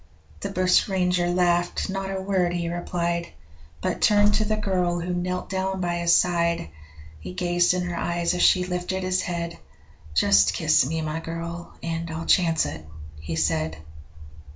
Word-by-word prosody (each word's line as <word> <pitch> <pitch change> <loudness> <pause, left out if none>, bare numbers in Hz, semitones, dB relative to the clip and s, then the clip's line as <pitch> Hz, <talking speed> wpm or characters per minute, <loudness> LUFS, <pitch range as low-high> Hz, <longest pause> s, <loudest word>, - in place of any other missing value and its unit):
The 200 - -4
bushranger 185 -1 +2
laughed 175 -1 +1
not 195 0 -3
a 195 0 -3
word 190 -2 0
he 170 -1 -2
replied, 170 -1 -2 0.5
But - - -2
turned 205 -1 +4
to 215 +1 +1
the 215 0 0
girl 180 -4 0
who 175 +1 -3
knelt 180 +1 -2
down 190 0 -1
by 175 -1 -1
his 170 0 +1
side. 170 - +2 0.5
He 90 +3 -8
gazed 175 - +2
in 180 - -1
her 175 -1 -3
eyes 170 0 -1
as 180 - -1
she 180 -1 +5
lifted 180 +1 -3
his 185 0 +1
head: 170 -1 -4 0.6
'Just 65 -2 +4
kiss - - +3
me 160 +2 -2
my 155 +1 -3
girl 170 +1 -7
and 165 0 -3
I'll 160 +1 -5
chance 165 -3 +3
it,' 80 +2 -6 0.4
he 80 +1 -5
said. 80 0 0
175 Hz, 165 wpm, -24 LUFS, 170-185 Hz, 0.6 s, she